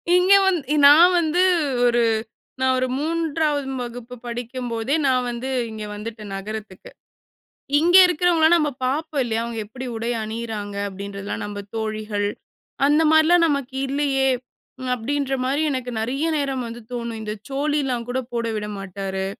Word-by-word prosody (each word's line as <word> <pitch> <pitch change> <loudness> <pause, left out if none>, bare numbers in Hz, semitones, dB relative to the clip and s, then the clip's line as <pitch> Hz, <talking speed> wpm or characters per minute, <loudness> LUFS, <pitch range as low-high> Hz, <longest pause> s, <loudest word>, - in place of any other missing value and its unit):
இங்கே 375 +2 +6
வந்து 305 -6 0
நான் 335 +5 +8
வந்து 335 +2 +1 0.4
ஒரு 240 -1 +3 0.6
நான் 260 0 +3
ஒரு 255 0 +1
3வது 310 -3 -1
வகுப்பு 245 0 -7
படிக்கும்போதே 240 +1 -3
நான் 255 -1 +2
வந்து 240 +2 -4 0.2
இங்க 215 -1 -6
வந்துட்டேன் 215 -1 -7
நகரத்துக்கு. 205 -1 -7 0.9
இங்க 345 +3 +3
இருக்கிறவங்களலாம் 345 -1 +4
நம்ம 300 -3 +1 0.2
பார்ப்போம் 290 +2 -1
இல்லையா? 225 -2 -1
அவங்க 235 -1 -5
எப்டி 250 +5 -8
உடை 230 +1 -3
அணியிறாங்க 215 -2 -5
அப்டின்றதலாம் 200 +1 -6
நம்ம 205 0 -6 0.2
தோழிகள் 215 -2 -2 0.6
அந்த 295 +2 +4
மாரிலாம் 335 +2 +5
நமக்கு 280 -3 -2
இல்லையே. 275 -1 +1 0.6
அப்டின்ற 270 +3 -2
மாரி 275 +4 0
எனக்கு 255 -2 -3
நறைய 270 +8 -1
நேரம் 270 -3 -1
வந்து 235 +1 -8
தோணும் 235 -2 -4
இந்த 210 -1 -4 0.2
சோழில 280 -2 0
கூட 255 - -1
போட 235 -1 -1
விட 210 0 -3
மாட்டாரு. 190 0 -4
250 Hz, 135 wpm, -22 LUFS, 220-295 Hz, 0.9 s, நான்